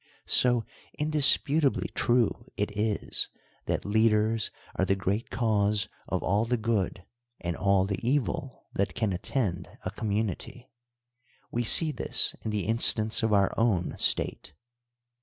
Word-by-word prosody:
So 120 -2 +3 0.3
indisputably 150 -1 +3
true 120 -2 +2 0.3
it 105 0 -3
is 105 0 -2 0.4
that - - -2
lead 110 +2 +2
ers 110 0 0 0.3
are - - 0
the 95 +1 +1
great 100 +4 -3
cause 105 -3 +1 0.2
of - - -3
all 100 +4 +1
the 125 +1 -1
good 105 -5 -2 0.3
and 85 -1 -4
all 100 -1 +1
the 100 -2 -3
evil 130 +1 -2
that 100 - -2
can 110 -4 -1
attend 90 -1 -3 0.2
a - - -3
community. 110 +4 -4 0.8
We 120 - -1
see 155 +7 +7
this - - 0
in - - -3
the 105 -3 -2
instance 110 0 +4
of 110 -1 0
our 100 -2 +2
own 105 -7 0
state. - - +1
110 Hz, 140 wpm, -27 LUFS, 100-120 Hz, 0.8 s, see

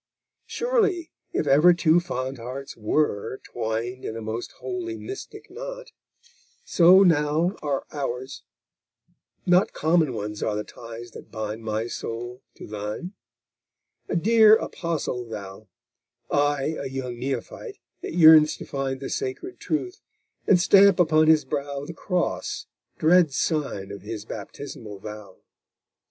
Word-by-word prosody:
Surely, 425 -9 0 0.2
if - - -1
ever 150 +6 +6
two 170 -1 +4
fond 130 -6 -4
hearts 130 +4 -7
were, 115 +1 -1
twined 115 +2 -4
In 110 - -4
a - - -6
most 110 +2 -5
holy, 355 -2 -5
mystic 395 +1 -9
knot, - - -8 0.7
so 185 +3 +6
now 160 +2 +2
Are 140 -2 -2
ours; 130 -2 -4 1.0
not 180 +1 +3
common 160 -1 +2
are 105 0 -3
the 105 - -2
ties 115 +1 -10
that - - -12
bind 110 0 -5
My 110 0 -2
soul 120 +2 -6
to - - -10
thine; 105 - -5 1.0
a - - -1
dear 220 +4 +6
Apostle 165 - -3
thou, 105 -2 -9 0.6
I 145 +1 +1
a 140 - -4
young 130 -2 -5
Neophyte 130 -2 -5 0.2
that - - -6
yearns 155 -2 +7
to - - -8
find 135 -1 -3
The 135 - -5
sacred 135 - -4
truth, 370 +6 -3 0.5
and 185 - +6
stamp 195 0 +6
upon 155 -2 +4
his 155 -1 +5
brow 140 -1 -3
The 170 - -7
Cross, 180 +1 -2 0.3
dread 165 -1 +4
sign 135 - -2
of 100 - -8
his 105 +1 -6
baptismal 110 -1 -8
vow! 105 -1 -10
140 Hz, 130 wpm, -25 LUFS, 115-175 Hz, 1.0 s, yearns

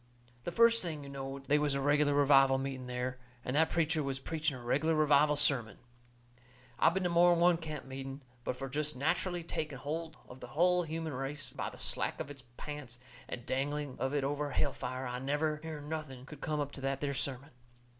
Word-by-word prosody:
The - - -2
first 230 +4 +6
thing 155 -5 -4
you 140 - -8
knowed 135 0 -6
they 150 +2 +3
was 145 -2 +1
a - - 0
reg'lar 145 +1 +3
revival 135 -2 +6
meeting 135 -1 -4
there, 125 +1 -3 0.3
and 125 - -1
that 160 +2 +4
preacher 160 -2 +1
was 135 -2 -2
preaching 155 0 -2
a - - -10
reg'lar 145 +7 +1
revival 150 -1 +5
sermon. 135 -6 +3 1.0
I - - +6
been 185 +3 -1
to 180 - +2
more'n 175 0 +5
one 175 0 +5
camp 155 -4 -6
meeting, 135 +1 -6 0.2
but 125 - -2
fur 135 +1 -5
jest 150 +1 -1
natcherally 175 +4 0
taking 150 -5 -3
holt 155 +4 -4
of 125 - -11
the - - -8
hull 180 +1 +5
human 160 -1 -3
race 135 +2 -4
by - - -3
the - - -13
slack - - 0
of 145 - -4
its 140 -2 -10 0.2
pants 145 -5 -7 0.3
and 120 - -6
dangling 145 +1 -2
of 130 - 0
it 145 - +1
over 145 +1 -1
hell 140 0 0
fire, 130 +1 -4
I 125 0 -3
never 150 +3 0
hearn 155 -2 -6
nothing 150 -5 -5
could 150 0 -11
come 155 -1 -1
up 145 -1 -2
to 135 - -9
that 135 0 -1
there 140 -1 -1
sermon. 135 +1 -3
145 Hz, 210 wpm, -33 LUFS, 135-155 Hz, 1.0 s, first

